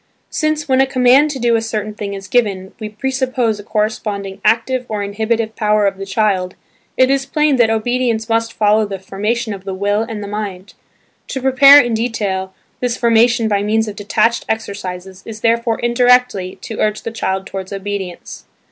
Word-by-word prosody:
Since, 310 -1 -1
when 265 -1 +3
a 270 - +3
command 260 +3 +4
to 285 - -4
do 235 -2 +2
a 225 - +1
certain 215 -1 -3
thing 200 -1 -5
is 195 0 -8
given, 195 -6 0
we 215 - -5
presuppose 255 -1 -1
a - - -9
corresponding 210 -2 -3
active 245 +3 +1
or 210 -2 -2
inhibitive 220 +2 -2
power 210 -1 +2
of 195 -1 0
the 195 - -6
child, 195 -3 0 0.4
it 260 +1 +4
is 275 0 0
plain 300 -1 +2
that 235 -2 +4
obedience 225 0 0
must 230 0 0
follow 215 0 +2
the 195 -1 -5
formation 210 +4 -3
of 195 -2 -9
the 195 -1 -5
will 205 +2 0
and 225 0 -4
of - - -6
the 205 - -6
mind. 200 -2 -6 0.5
To 265 - -4
prepare, 275 +2 +8
in 240 -4 +1
detail, 205 -5 -2 0.3
this 245 -1 -1
formation 235 0 +3
by 205 -2 +1
means 220 +2 +1
of 210 - -6
detached 215 +3 +1
exercises 190 -4 -5
is 220 -1 -8
therefore 230 0 +1
indirectly, 240 -5 +2
to 220 - -6
urge 215 0 0
the 230 - -4
child 190 -4 -2
towards 190 0 -7
obedience. 195 -2 -6
220 Hz, 185 wpm, -17 LUFS, 200-240 Hz, 0.5 s, prepare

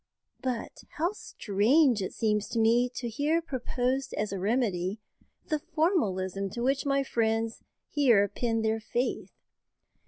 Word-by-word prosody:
But 250 -3 -4 0.2
how 335 +4 +1
strange 240 - +2
it 185 - -3
seems 210 -2 0
to 230 - -1
me 235 +3 +4
to 240 - -3
hear 290 +8 +1
proposed 260 -3 -2
as 210 -1 -2
a 195 - -3
remedy 200 -2 0 0.5
the 305 -2 +1
formalism 215 - 0
to 235 +5 -4
which 275 +3 +1
my 275 0 +2
friends 225 -2 0 0.3
here 240 -9 +4
pin 225 +2 -1
their 220 0 +1
faith! 240 +3 -2
235 Hz, 135 wpm, -29 LUFS, 210-275 Hz, 0.5 s, me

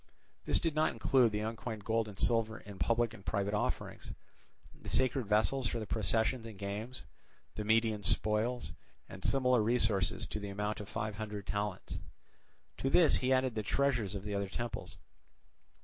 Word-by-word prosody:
This - - +4
did 165 - 0
not 155 +1 +2
include 125 -4 +3
the 105 0 -2
uncoined 110 -1 -4
gold 115 0 +1
and 100 -2 -10
silver 115 0 +1
in 100 -2 -11
public 115 +5 +2
and 100 -4 -12
private 100 0 -1
offerings, 105 - -2 0.6
the - - -10
sacred 130 -2 +2
vessels 110 +5 +2
for 120 - -2
the 110 - -4
processions 110 +3 0
and 110 -3 -10
games, 105 +6 -5 0.5
the 105 - -4
Median 110 0 +2
spoils, 110 +5 +1 0.4
and 95 - -10
similar 125 -3 +3
resources 105 -4 +2
to - - -3
the 100 -1 -5
amount 105 +2 -2
of 105 - -7
five 110 -2 -3
hundred 105 -2 -5
talents. 100 -2 -3 0.8
To 135 - 0
this 160 +3 +6
he 130 0 0
added 130 -1 +3
the 110 - -1
treasures 120 -3 0
of 100 - -5
the 105 0 -4
other 100 -1 -1
temples. 120 +4 -5
110 Hz, 170 wpm, -33 LUFS, 105-120 Hz, 0.8 s, this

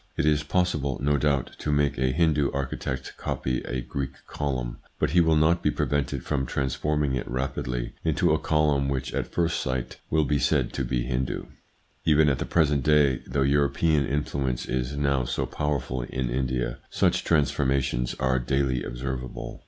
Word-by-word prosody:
It - - +1
is 75 -1 +3
possible, 75 -4 0
no 75 +1 +2
doubt, 70 -2 +1
to 75 - -1
make 75 -3 +1
a 65 -1 +2
Hindu 75 -2 +2
architect 65 -1 -3
copy 65 -1 -2
a 60 +1 -2
Greek 70 +2 -4
column, 65 -5 -3 0.2
but - - 0
he 90 +2 +5
will 80 -1 +3
not 80 +3 +3
be - - +2
prevented 70 -2 -1
from 65 -4 -1
transforming 70 +2 0
it 65 - -3
rapidly 60 -1 -3
into - - +2
a - - +2
column 75 -3 +2
which 65 -2 -2
at - - -2
first 85 -1 +1
sight 65 -1 -3
will 80 -1 +2
be 70 +1 +1
said - - +1
to - - -1
be - - -1
Hindu. 65 +1 -2 0.6
Even 75 -1 +5
at 70 - 0
the - - -1
present 75 -4 +2
day, 70 -1 +3
though 70 +2 +1
European 70 +2 +2
influence 70 -3 -1
is 65 +2 -2
now 70 -2 +1
so - - -1
powerful 70 -4 -2
in 60 0 -3
India, 65 0 -1
such - - +2
transformations 65 -5 +1
are 65 -1 +2
daily 65 0 0
observable. 65 0 -5
70 Hz, 170 wpm, -26 LUFS, 65-75 Hz, 0.6 s, he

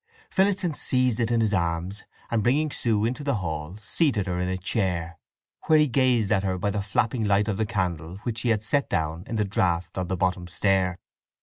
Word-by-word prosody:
Phillotson 190 -3 +2
seized 125 -5 +1
it 115 -1 +1
in 115 -1 +2
his 110 -2 +1
arms, 85 +2 -2 0.3
and 115 -2 +2
bringing 145 +7 +2
Sue 110 -5 +1
into 125 +5 -2
the 140 -2 0
hall 80 -2 -4
seated 120 - +1
her 90 -2 -2
on 90 - -1
a 95 0 -1
chair, 90 -3 -2 0.5
where 155 - +6
he 150 0 +4
gazed 125 -5 +2
at 100 -3 +3
her 95 -1 -1
by 100 +3 -1
the 105 0 -1
flapping 110 +3 0
light 100 0 +2
of 105 -3 -1
the 110 -1 0
candle 90 -5 -2
which 115 -2 -2
he 120 - 0
had 110 -2 +1
set 140 +6 0
down 80 -1 -1
in 115 - -4
the 105 -1 +1
draught 90 -2 0
on 90 - -2
the 95 - -2
bottom 90 0 0
stair. 95 0 +1
105 Hz, 215 wpm, -25 LUFS, 90-120 Hz, 0.5 s, where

